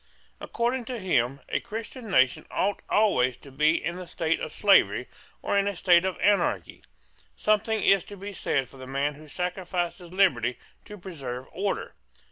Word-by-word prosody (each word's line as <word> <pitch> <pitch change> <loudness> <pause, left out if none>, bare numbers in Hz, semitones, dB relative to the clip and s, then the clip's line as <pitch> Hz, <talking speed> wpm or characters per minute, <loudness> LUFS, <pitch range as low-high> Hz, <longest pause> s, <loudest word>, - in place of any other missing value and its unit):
According 240 +1 -1
to 250 +1 -4
him, 140 - 0
a - - 0
Christian 225 +2 -7
nation 130 -8 +3
ought 205 - 0
always 130 - +3
to 140 - -15
be 150 +4 +3
in 175 +2 -3
a 180 - -8
state 165 -1 -1
of - - -5
slavery - - +4 0.4
or - - 0
in 200 0 +3
a 200 - -1
state 180 -1 +4
of 190 -2 -2
anarchy. 175 - +1 0.5
Something 215 +1 +1
is 195 -3 +5
to 205 - -10
be 200 +2 -7
said 135 -7 -1
for 135 - -16
the 130 0 -9
man 140 +2 -1
who 155 +2 -14
sacrifices 180 +1 -3
liberty 125 - +2 0.3
to 210 -1 -10
preserve 135 -9 -6
order. 195 +3 -3
180 Hz, 170 wpm, -27 LUFS, 140-200 Hz, 0.5 s, is